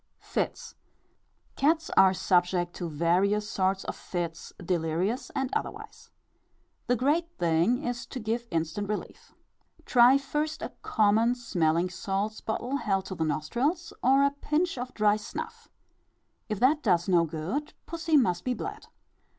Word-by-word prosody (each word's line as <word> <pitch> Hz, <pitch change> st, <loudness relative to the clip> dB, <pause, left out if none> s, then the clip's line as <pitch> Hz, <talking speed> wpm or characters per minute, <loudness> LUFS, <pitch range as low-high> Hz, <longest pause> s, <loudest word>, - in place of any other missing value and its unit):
Fits. -, -, -3 dB, 0.8 s
Cats 320 Hz, +3 st, +1 dB
are 190 Hz, -1 st, +7 dB
subject 180 Hz, -1 st, +1 dB
to 175 Hz, -2 st, -5 dB
various 185 Hz, +7 st, +1 dB
sorts 190 Hz, -1 st, 0 dB
of -, -, -5 dB
fits, 170 Hz, -2 st, -5 dB
delirious 180 Hz, -, -1 dB
and 265 Hz, -1 st, -1 dB
otherwise. -, -, -5 dB, 0.8 s
The 245 Hz, -, +3 dB
great 300 Hz, +8 st, +1 dB
thing 175 Hz, -, +2 dB
is 245 Hz, 0 st, -3 dB
to 260 Hz, -, -6 dB
give 235 Hz, +1 st, -2 dB
instant 165 Hz, +5 st, -2 dB
relief. 210 Hz, -, -6 dB, 0.5 s
Try 250 Hz, +2 st, +6 dB
first 295 Hz, +3 st, -3 dB
a -, -, -3 dB
common 220 Hz, +2 st, +3 dB
smelling 175 Hz, -7 st, 0 dB
salts 200 Hz, +4 st, -3 dB
bottle 245 Hz, +5 st, -2 dB
held 195 Hz, -7 st, -1 dB
to 190 Hz, -, -5 dB
the 165 Hz, -3 st, -2 dB
nostrils, 245 Hz, -, -1 dB
or 270 Hz, +2 st, +5 dB
a 280 Hz, -, +3 dB
pinch 305 Hz, +5 st, -1 dB
of 250 Hz, 0 st, -5 dB
dry 210 Hz, -1 st, +3 dB
snuff; 210 Hz, -, -7 dB, 0.8 s
if 215 Hz, -2 st, -2 dB
that 285 Hz, +6 st, +4 dB
does 175 Hz, -, +2 dB
no 175 Hz, -3 st, +4 dB
good, 165 Hz, -, -4 dB
pussy 330 Hz, -2 st, +1 dB
must 180 Hz, -9 st, +2 dB
be 250 Hz, -1 st, -1 dB
bled. 415 Hz, -, -6 dB
215 Hz, 140 wpm, -28 LUFS, 175-265 Hz, 0.8 s, are